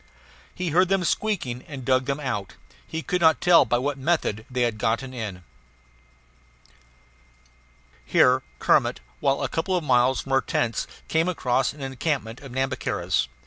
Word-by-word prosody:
He 180 Hz, -1 st, -2 dB
heard 180 Hz, +4 st, +3 dB
them 195 Hz, -2 st, +2 dB
squeaking 170 Hz, -, -1 dB
and 135 Hz, -4 st, -8 dB
dug 130 Hz, 0 st, +2 dB
them 140 Hz, +1 st, -1 dB
out; 105 Hz, -9 st, -4 dB, 0.3 s
he 160 Hz, 0 st, -4 dB
could 180 Hz, +6 st, -1 dB
not 160 Hz, -1 st, +5 dB
tell 175 Hz, -5 st, +6 dB
by 120 Hz, +1 st, +1 dB
what 135 Hz, +2 st, -2 dB
method 130 Hz, -8 st, 0 dB
they 125 Hz, -1 st, 0 dB
had 115 Hz, -3 st, -1 dB
gotten 115 Hz, +4 st, -1 dB
in. 105 Hz, -7 st, -6 dB, 2.6 s
Here -, -, +4 dB, 0.2 s
Kermit, -, -, +2 dB, 0.2 s
while 135 Hz, 0 st, +1 dB
a -, -, +1 dB
couple 185 Hz, +3 st, -1 dB
of 175 Hz, -, -3 dB
miles 125 Hz, -1 st, +3 dB
from 135 Hz, -, -9 dB
our 135 Hz, 0 st, +4 dB
tents, 115 Hz, -2 st, -1 dB, 0.2 s
came 160 Hz, +2 st, +1 dB
across 135 Hz, -7 st, 0 dB
an 145 Hz, -, -13 dB
encampment 135 Hz, -3 st, -3 dB
of 135 Hz, -3 st, -10 dB
Nhambiquaras. 130 Hz, 0 st, -1 dB
135 Hz, 155 wpm, -25 LUFS, 125-160 Hz, 2.6 s, tell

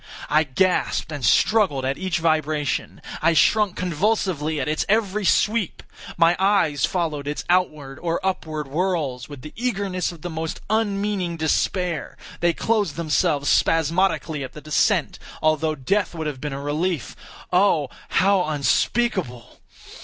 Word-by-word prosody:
I 155 Hz, +1 st, +4 dB
gasped 175 Hz, +3 st, 0 dB
and 145 Hz, -4 st, -5 dB
struggled 145 Hz, -, +3 dB
at 135 Hz, +1 st, 0 dB
each 190 Hz, -1 st, -1 dB
vibration. 155 Hz, -3 st, -1 dB, 0.2 s
I 165 Hz, +1 st, +4 dB
shrunk 205 Hz, +4 st, +3 dB
convulsively 175 Hz, -4 st, 0 dB
at 135 Hz, -, -2 dB
its 155 Hz, +1 st, 0 dB
every 210 Hz, -1 st, +1 dB
sweep. 210 Hz, +1 st, +1 dB, 0.3 s
My 170 Hz, +1 st, +5 dB
eyes 190 Hz, -8 st, +2 dB
followed 155 Hz, -6 st, -2 dB
its 150 Hz, -, -3 dB
outward 155 Hz, -7 st, 0 dB
or 170 Hz, -1 st, -1 dB
upward 155 Hz, -5 st, -2 dB
whirls 150 Hz, -5 st, -2 dB
with 145 Hz, -3 st, -10 dB
the 150 Hz, -, -9 dB
eagerness 200 Hz, -7 st, -2 dB
of 170 Hz, -3 st, -13 dB
the 175 Hz, -, -4 dB
most 160 Hz, 0 st, -4 dB
unmeaning 200 Hz, -5 st, 0 dB
despair; 165 Hz, +2 st, -1 dB, 0.2 s
they 170 Hz, 0 st, +3 dB
closed 215 Hz, +3 st, 0 dB
themselves 155 Hz, -2 st, 0 dB
spasmodically 165 Hz, -2 st, +1 dB
at 130 Hz, -, -8 dB
the -, -, -9 dB
descent, 155 Hz, -1 st, +1 dB, 0.2 s
although 155 Hz, 0 st, +1 dB
death 175 Hz, +8 st, -1 dB
would 160 Hz, -1 st, -4 dB
have 145 Hz, -4 st, -4 dB
been 150 Hz, -, -3 dB
a 135 Hz, -, -4 dB
relief, 150 Hz, 0 st, -2 dB, 0.4 s
oh, 180 Hz, -6 st, +3 dB, 0.2 s
how 190 Hz, +1 st, +3 dB
unspeakable! 150 Hz, -, -1 dB
165 Hz, 140 wpm, -23 LUFS, 150-190 Hz, 0.4 s, My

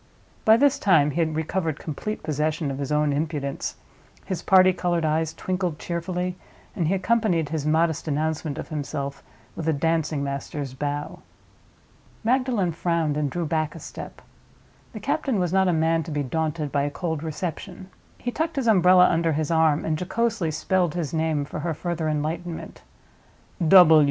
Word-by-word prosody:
By 220 Hz, +1 st, +7 dB
this 280 Hz, +2 st, +3 dB
time 160 Hz, -7 st, +4 dB
he 155 Hz, -, -3 dB
had 160 Hz, -2 st, +1 dB
recovered 160 Hz, 0 st, -1 dB
complete 170 Hz, +9 st, -5 dB
possession 155 Hz, 0 st, -1 dB
of 135 Hz, -, -5 dB
his 140 Hz, 0 st, -3 dB
own 150 Hz, -1 st, +2 dB
impudence; 145 Hz, -2 st, -3 dB, 0.5 s
his 185 Hz, -, -3 dB
party 185 Hz, -1 st, +5 dB
colored 175 Hz, -2 st, 0 dB
eyes 155 Hz, +1 st, +1 dB
twinkled 180 Hz, -1 st, -2 dB
cheerfully, 180 Hz, +2 st, -3 dB, 0.4 s
and 170 Hz, -, 0 dB
he 190 Hz, -, +2 dB
accompanied 190 Hz, -6 st, +1 dB
his 155 Hz, -1 st, -2 dB
modest 160 Hz, 0 st, +1 dB
announcement 155 Hz, 0 st, -1 dB
of -, -, -6 dB
himself 140 Hz, -2 st, -4 dB, 0.3 s
with 165 Hz, -, -4 dB
a -, -, +3 dB
dancing 155 Hz, -1 st, 0 dB
master's 140 Hz, 0 st, -4 dB
bow. 145 Hz, +2 st, -4 dB, 1.0 s
Magdalen 240 Hz, -6 st, +1 dB
frowned, 165 Hz, -2 st, 0 dB
and 150 Hz, -1 st, 0 dB
drew 175 Hz, +3 st, -2 dB
back 155 Hz, 0 st, -1 dB
a -, -, -8 dB
step. -, -, -9 dB, 0.7 s
The -, -, -7 dB
captain 260 Hz, -6 st, -1 dB
was 180 Hz, -1 st, 0 dB
not 190 Hz, 0 st, +4 dB
a -, -, +3 dB
man 165 Hz, 0 st, +2 dB
to 160 Hz, -, -7 dB
be 145 Hz, -2 st, -1 dB
daunted 155 Hz, +1 st, -2 dB
by 140 Hz, -, +1 dB
a 145 Hz, -, 0 dB
cold 160 Hz, 0 st, -3 dB
reception. 180 Hz, +4 st, -5 dB, 0.3 s
He 245 Hz, -, -3 dB
tucked 320 Hz, +4 st, -2 dB
his 270 Hz, -3 st, -1 dB
umbrella 185 Hz, -4 st, +6 dB
under 165 Hz, -1 st, +1 dB
his 155 Hz, +1 st, -1 dB
arm 160 Hz, -2 st, +3 dB
and 155 Hz, -1 st, -1 dB
jocosely 215 Hz, -1 st, 0 dB
spelled 175 Hz, +2 st, 0 dB
his 170 Hz, -4 st, -3 dB
name 160 Hz, -2 st, 0 dB
for 150 Hz, -, -6 dB
her 165 Hz, +1 st, -2 dB
further 170 Hz, -1 st, -2 dB
enlightenment. 160 Hz, +3 st, -4 dB
160 Hz, 165 wpm, -24 LUFS, 150-180 Hz, 1.0 s, By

